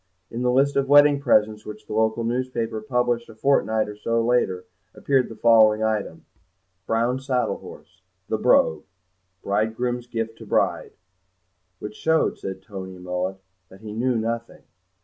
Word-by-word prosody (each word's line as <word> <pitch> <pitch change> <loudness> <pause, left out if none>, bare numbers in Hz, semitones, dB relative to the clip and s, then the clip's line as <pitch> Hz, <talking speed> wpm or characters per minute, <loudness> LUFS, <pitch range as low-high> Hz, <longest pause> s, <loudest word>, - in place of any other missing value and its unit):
In 115 - -4
the 125 - +1
list 135 +3 +2
of 135 -1 0
wedding 145 0 +6
presents 110 -5 +2
which 105 0 -10
the 105 - -7
local 110 +1 +1
newspaper 115 -2 -2
published 120 0 -1
a 115 - -12
fortnight 110 -3 +1
or 105 - -8
so 115 +2 -1
later 105 -7 +1 0.3
appeared 135 -3 +1
the 115 - -9
following 110 -2 +5
item: 110 -2 -2 0.6
"Brown 120 +3 0
saddle 130 -2 -1
horse, - - -14 0.3
'The - - -2
Brogue,' 80 - +3 0.6
bridegroom's 115 +4 -1
gift 115 -1 -4
to - - -10
bride." - - 0 0.8
"Which 105 +2 -7
shows," 160 0 0
said 95 0 -6
Toby 95 -2 -8
Mullet, 90 +1 -3 0.3
"that 95 +2 -16
he 105 -1 -8
knew 125 +3 0
nothing." 115 +1 -4
115 Hz, 150 wpm, -23 LUFS, 105-125 Hz, 0.8 s, wedding